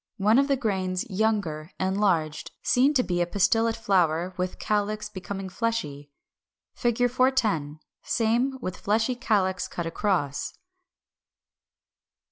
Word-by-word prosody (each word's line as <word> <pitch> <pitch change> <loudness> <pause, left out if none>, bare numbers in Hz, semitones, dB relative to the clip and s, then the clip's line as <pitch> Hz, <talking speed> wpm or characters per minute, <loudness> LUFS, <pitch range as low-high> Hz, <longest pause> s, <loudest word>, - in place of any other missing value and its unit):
One 215 +4 +4
of 275 - +3
the 280 - +3
grains 190 -3 -1
younger, 185 -7 -1
enlarged; 185 -5 0
seen 270 +4 +3
to 255 - +4
be 175 -4 -1
a 175 - +1
pistillate 225 +4 +2
flower 180 -5 +1
with 185 -1 -3
calyx 210 0 -1
becoming 195 0 -6
fleshy. 185 -10 -3 0.6
410. 240 - +1 0.2
Same, 240 +4 +1
with 185 -7 -5
fleshy 220 +4 +1
calyx 200 -7 0
cut 170 - -5
across. 165 -5 -1
205 Hz, 110 wpm, -26 LUFS, 180-230 Hz, 0.6 s, One